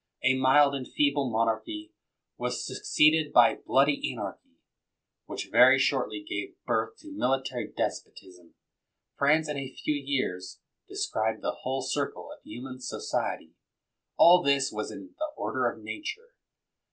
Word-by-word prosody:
A 130 +1 +4
mild 135 +2 +5
and 135 -2 -5
feeble 145 -2 +1
monarchy 315 - -2 0.4
was - - -3
suc - - -6
ceeded 155 - +4
by 120 - +6
bloody 140 +2 +3
anarchy, 270 0 -8 0.7
which - - -6
very - - +7
shortly 315 - 0
gave 360 - -4
birtii 440 - -1
to 310 - -12
military 130 - -1
despotism. 90 -2 -6 0.6
France, 155 +3 +3
in 150 -1 -3
a 135 -1 -5
few 150 - -2
years, 135 -11 -3 0.3
described 110 0 -2
the - - -2
whole 130 +1 -2
circle 140 +2 -3
of - - -26
human 130 +1 -9
society. 125 - -3 0.6
All 180 +1 +8
this 140 -3 +2
was 105 0 -4
in 285 - -10
the 310 - -1
order - - 0
of - - -10
nature. 445 +9 -7
140 Hz, 140 wpm, -28 LUFS, 130-160 Hz, 0.7 s, All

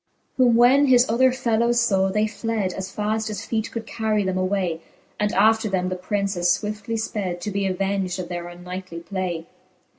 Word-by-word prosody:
Whom 245 -3 +5
when 260 +4 +5
his 250 -1 +5
other 255 +3 +4
fellowes 235 -2 +1
favv, 195 -4 +2
they 210 +1 +2
fled 215 -3 -2
As 190 0 -6
faft 215 +1 -1
as 215 +1 -5
feete 220 -1 -2
could 230 -1 -5
carry 215 -2 0
them 190 -1 -1
away 185 -2 0
j - - -24 0.4
And 210 0 +1
after 220 +2 +4
them 185 -1 0
the 185 - -2
Prince 200 +2 -2
as 175 0 +3
fwiftly 210 +1 -4
(ped,. 200 -5 -3
To 210 - -4
be 200 0 0
aveng'd 195 0 -1
of 180 -2 -5
their 175 -1 -5
unknightly 180 0 -8
play. 175 -3 -3
200 Hz, 190 wpm, -23 LUFS, 185-225 Hz, 0.4 s, Whom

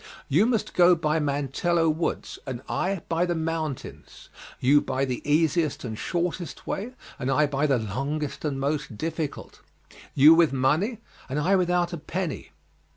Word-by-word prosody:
You 175 +11 +3
must 230 -4 -1
go 175 0 +6
by 160 -1 0
Mantello 150 +4 0
Woods, 160 +1 -2
and 130 -2 -5
I 190 -1 -1
by 170 +2 +1
the 175 - 0
mountains; 160 -3 -5 0.3
you 145 +3 +5
by 130 +1 -1
the 125 -2 -3
easiest 155 0 +2
and 115 -3 -4
shortest 175 +6 -3
way, 230 +6 -4 0.3
and 130 -1 -2
I 150 +3 +3
by 145 +1 0
the 135 -3 +3
longest 135 +7 -3
and 145 -3 -2
most 140 -4 -2
difficult; 160 0 -5 0.5
you 150 +4 +8
with 165 -3 +4
money 155 - +1 0.3
and 135 - -2
I 180 +7 +3
without 180 -1 +1
a - - -3
penny. 165 - -4
155 Hz, 155 wpm, -26 LUFS, 140-175 Hz, 0.5 s, you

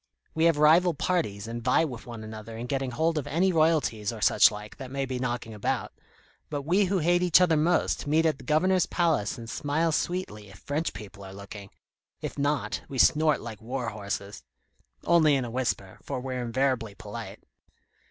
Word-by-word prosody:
We 160 +1 +2
have 165 -3 +4
rival 165 +3 +5
parties, 115 - -1
and 115 +1 -5
vie 130 +6 +3
with 125 -6 -8
one 115 -2 -7
another 110 +1 -8
in 120 - -5
getting 135 +1 -2
hold 160 +5 0
of 145 - -6
any 175 +6 +2
royalties 155 - +1
or 115 - -8
such 105 - +6
like, 105 0 -9
that 130 -3 -8
may 135 +1 -2
be 130 -1 -4
knocking 120 -3 -3
about; 105 - -2 0.6
but 145 -2 -3
we 185 +7 +3
who 190 +1 0
hate 175 +1 +2
each 180 -1 +5
other 180 -3 +4
most, 160 0 +1
meet 160 +3 +3
at 155 -3 +1
the - - -12
Governor's 180 +6 +2
Palace 160 - 0
and 115 -1 -8
smile 150 +7 0
sweetly 150 - -3
if 95 - -14
French 150 +9 -3
people 100 -2 -10
are 95 0 -9
looking; 100 0 -10 0.5
if - - -5
not, 145 +1 -1
we 135 - -5
snort 155 +3 +4
like 110 -3 -8
war 125 +1 -3
horses 100 -1 -5 0.6
only 160 -4 +5
in 130 -2 0
a 120 - -6
whisper, 115 -6 -2
for - - -4
we're 130 0 -4
invariably 120 -3 -1
polite." - - -8
135 Hz, 190 wpm, -27 LUFS, 115-160 Hz, 0.6 s, such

